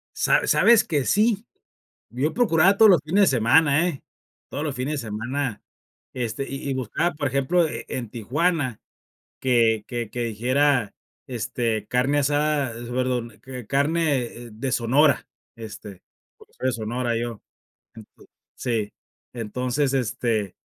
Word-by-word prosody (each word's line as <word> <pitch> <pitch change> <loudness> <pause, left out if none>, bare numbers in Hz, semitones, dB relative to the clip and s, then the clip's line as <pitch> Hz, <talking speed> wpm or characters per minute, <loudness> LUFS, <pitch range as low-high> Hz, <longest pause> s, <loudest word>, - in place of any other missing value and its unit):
Sa - - +2
sabes 235 -2 +5
que 145 -5 -1
sí, 215 +1 +2 0.6
yo 130 +7 -1
procuraba 195 -4 +4
todos 220 -3 +8
los 170 -6 +4
fines 190 +6 +3
de 125 - +1
semana, 145 +7 +4
¿eh?, 140 -6 -5 0.5
todos 145 - -4
los 145 -4 -3
fines 135 +2 -2
de 115 - -8
semana, 120 +3 -3 0.5
este, 125 +2 -3
y 135 +1 -5
y - - 0
buscaba, 130 +7 -1
por 145 -2 -1
ejemplo, 140 +6 +2
e - - -6
en 120 -4 -5
Tijuana, 130 - -1 0.6
que 115 -4 +2
que 120 -3 -4
que 120 - -3
dijera, 125 +1 +1 0.3
este, 115 -3 -2
carne 130 +4 +1
asada, 145 -2 +1
perdón, 120 -1 -3
que 125 -3 -8
carne 140 -5 0
de 125 +4 -4
Sonora, 135 +4 +3 0.3
este, 105 -4 -10 0.3
porque - - -20
soy 130 - -2
de - - +1
Sonora 115 +1 -2
yo. 115 -2 -4 0.5
Ento 110 -2 -15 0.3
Sí. 110 -4 -2 0.4
Entonces, 125 +4 -1
este, 115 -5 -1
130 Hz, 140 wpm, -24 LUFS, 115-145 Hz, 0.6 s, todos